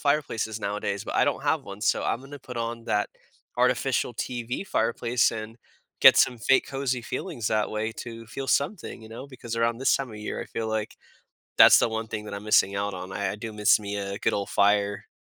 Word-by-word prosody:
fireplaces 140 -7 0
nowadays, 100 0 -3
but - - -5
I - - +4
don't 140 -1 -1
have 150 0 +1
one, 100 -3 -9
so - - +1
I'm 115 - -1
gonna 140 +1 -10
put 125 -2 -10
on 115 0 -4
that 105 -2 0 0.5
artificial, 125 0 +1
TV 120 - -4
fireplace 120 - +1
and 110 0 -7 0.4
get - - +9
some 125 - +4
fake 115 +5 +3
cozy 135 -2 -2
feelings 130 - -4
that 110 -1 0
way, 110 +1 -2
to 115 0 -8
feel 135 +4 -6
something, 145 - -1
you 110 - -11
know? 115 +4 -8
Because 125 -4 -7
around 115 0 +1
this 135 - +3
time 135 -3 -5
of 110 - -9
year, 105 0 -5
I - - -10
feel 115 - -4
like 110 0 -3 0.6
that's - - +9
the - - +2
one 110 0 -3
thing 105 -1 -5
that - - -7
I'm 100 +1 -7
missing 100 -2 +3
out 100 0 -2
on. 95 +1 -7
I 100 -1 -1
I - - -6
do 110 +1 -6
miss 105 -1 +4
me 100 -1 -4
a 100 0 -4
good - - +1
ole 100 -1 -2
fire. 100 0 +2
115 Hz, 220 wpm, -26 LUFS, 105-125 Hz, 0.6 s, get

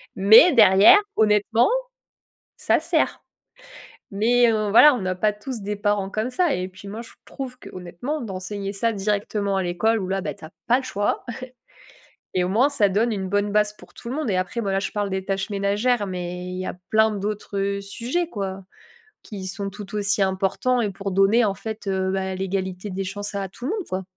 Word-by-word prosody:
Mais 220 - +7
derrière, 215 - +7 0.2
honnêtement, 215 +2 +3 0.9
ça - - +2
sert, - - 0 0.9
mais 235 +4 +3
heu, 215 -1 0
voilà, 295 +7 +8
on 245 - -3
n'a 185 0 -1
pas 210 +3 +1
tous 225 +3 -7
des 205 +1 -3
parents 205 -1 0
comme 215 +4 -2
ça, 335 +3 +1
et 185 +1 -3
puis 190 +2 -14
moi, 215 +3 -6
je 235 - -14
trouve 255 -2 -7
que, - - -12
honnêtement, 185 - -5
d'enseigner 195 -1 -5
ça 230 +3 0
directement 200 0 -1
à 190 - 0
l'école, 200 +6 +1
où 185 - -3
là, 195 0 -1
tu 150 -1 -6
as 155 - -10 0.2
pas 245 - +5
le 265 - -6
choix 205 -4 -2 1.1
et 180 -1 +2
au - - -2
moins 235 +9 +3
ça 235 -8 +2
donne 220 +5 +1
une 195 -3 -3
bonne 205 +1 0
base 210 0 +2
pour - - -17
tout - - -11
le 265 - -3
monde, 300 -7 -2
et 185 - +1
après, 185 +6 -2
voilà, 195 -2 0
je 195 - -4
parle 205 -1 -1
des 190 0 -3
tâches 195 +1 -2
ménagères, 205 +3 0
mais 180 -1 -5
il 180 0 -5
y 185 - -4
a - - -4 0.2
plein 220 0 +4
d'autres, 205 0 -4
heu, 200 0 -1
sujets, 245 - -3
quoi, 195 -2 -5 0.6
qui 195 -3 -8
sont 200 +1 -4
tout 200 +1 -10
aussi 205 0 +1
importants, 195 +6 0
et 210 - 0
pour 195 +1 -5
donner, 195 +5 +4
en 200 - 0
fait, 220 +1 -7
heu, 190 -1 0
ben 190 0 -2
l'égalité 190 0 -3
des 195 0 -3
chances 205 +2 -5
à 195 -1 -3
tout 235 +6 -10
le - - -1
monde, 410 -5 -4
quoi. 185 +1 -3
200 Hz, 210 wpm, -23 LUFS, 190-220 Hz, 1.1 s, voilà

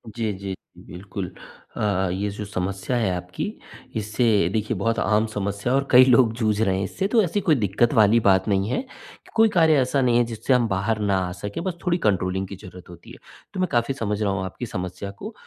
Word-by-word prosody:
जी, 110 -2 -1
जी, 95 0 -6 0.2
बिल्कुल। 95 0 -7 0.5
अ, - - -3 0.3
ये 100 +3 -2
जो 105 +1 -6
समस्या 100 +4 -3
है 110 -5 +1
आपकी, 90 - -5 0.5
इससे, 110 +3 -1 0.3
देखिए, 110 +1 -1
बहुत 115 +3 0
आम 105 +2 +2
समस्या 100 +2 -3
है - - +4
और 140 - -4
कई 125 0 +9
लोग 120 -3 +4
जूझ 110 -2 0
रहे 95 -4 +2
हैं 95 - -1
इससे, 190 - -2
तो 225 +1 +3
ऐसी 195 +4 -1
कोई 155 -4 +3
दिक्कत 110 +1 +1
वाली 110 +1 +5
बात 95 +2 +4
नहीं 100 0 +1
है, 130 - 0
कि 260 - -17
कोई 225 -1 +5
कार्य 160 -4 +4
ऐसा 135 +2 +1
नहीं 120 -2 +3
है, 120 - +4
जिससे 115 +3 -1
हम 120 -2 +3
बाहर 105 +3 -1
ना 100 -2 +1
आ - - -5
सकें, 100 - -6
बस 185 -3 -3
थोड़ी 175 0 +2
कंट्रोलिंग 95 -1 0
की 100 - -8
ज़रूरत 90 -2 -13
होती 85 - -13
है। - - -12 0.4
तो 185 - -5
मैं 185 - +1
काफ़ी 120 +3 +1
समझ 105 -4 -3
रहा 100 -2 +1
हूँ 95 -1 -2
आपकी 110 +6 -6
समस्या 90 -1 -5
को, 210 - -9
105 Hz, 225 wpm, -23 LUFS, 95-125 Hz, 0.5 s, कई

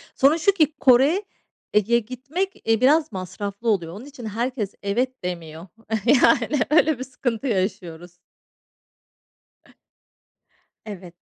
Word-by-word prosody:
Sorun 280 +4 +4
şu 335 +5 +3
ki, 310 -6 +1
Kore'ye 250 - +1
gitmek, 275 - -5
e, 225 0 +3
biraz 300 +4 +3
masraflı 200 +4 -5
oluyor. 170 -6 0
Onun 210 +7 -10
için, 280 -5 -11
herkes 225 -1 -3
evet 250 +5 -2
demiyor. 170 -1 -6 0.4
Yani, 270 +1 +4
öyle 310 -3 +3
bir - - -3
sıkıntı 255 -1 -3
yaşıyoruz. 180 -5 -3 2.7
Evet. 190 -5 -9
235 Hz, 105 wpm, -23 LUFS, 200-275 Hz, 2.7 s, Sorun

